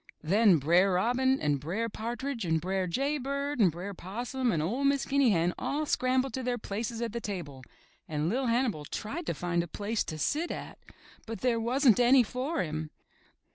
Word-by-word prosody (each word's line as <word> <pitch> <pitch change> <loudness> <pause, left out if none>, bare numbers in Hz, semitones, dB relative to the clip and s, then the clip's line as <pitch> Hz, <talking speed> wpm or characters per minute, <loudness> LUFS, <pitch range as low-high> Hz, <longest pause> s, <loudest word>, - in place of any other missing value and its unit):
Then 195 +2 +5
Br*er 175 +7 +3
Robin 250 +7 +2
and 145 -2 +1
Br*er 185 +11 -2
Partridge 235 +3 -4
and 160 -2 +1
Br'er 185 +2 -1
Jay 275 - 0
Bird 280 +1 -3
and 190 -6 +5
Br'er 180 +5 -6
Possum 240 +7 -2
and 155 -3 0
01' 265 +8 0
Miss 280 -1 0
Guinea 275 -2 +3
Hen 175 -3 +2
all 300 +2 -1
scrambled 255 -1 +1
to 260 - -2
their 245 -1 -1
places 225 +2 -4
at 230 -2 -3
the 235 - -3
table 170 -11 -5 0.5
and 150 0 -1
LiT 250 +6 0
Hannibal 230 - 0
tried 265 - -5
to - - -1
find 175 -1 0
a 170 - -5
place 210 +6 -2
to 155 - -5
sit 305 - 0
at, - - -7 0.5
but 225 0 -6
there 245 -2 +2
wasn't 245 +1 +3
any 250 +1 +6
for 260 +8 -2
him. 155 -1 -4
230 Hz, 190 wpm, -29 LUFS, 175-260 Hz, 0.5 s, any